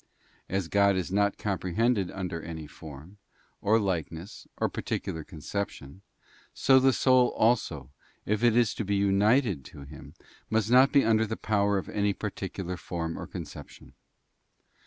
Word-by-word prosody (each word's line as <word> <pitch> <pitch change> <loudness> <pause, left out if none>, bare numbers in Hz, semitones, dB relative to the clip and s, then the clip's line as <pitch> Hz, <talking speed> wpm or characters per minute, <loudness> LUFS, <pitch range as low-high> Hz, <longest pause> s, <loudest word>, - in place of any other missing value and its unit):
As 95 -2 -1
God 100 +1 +3
is 90 -1 -2
not 100 +1 +1
comprehended 100 +1 0
under 90 -4 -5
any 80 -2 -7
form, 80 +6 -12 0.4
or 110 +2 +3
likeness, 95 0 -4
or - - +1
particular 80 -1 -4
conception, 85 -1 -6 0.5
so 130 0 +5
the 135 +1 +4
soul 130 -1 +4
also, 85 - +1 0.3
if 105 +2 -1
it 120 -1 +4
is 120 -4 +3
to - - -3
be 100 0 -1
united 100 - +2
to - - -12
Him, 70 +1 -12 0.3
must 110 +1 0
not 130 +2 +6
be 140 -4 +4
under 110 0 +3
the 110 - -4
power 100 -1 +1
of 95 - -4
any 100 -1 0
par 105 +1 -4
ticular 95 -2 -5
form 80 -2 -4
or - - -7
conception. - - -10
100 Hz, 155 wpm, -28 LUFS, 85-110 Hz, 0.5 s, not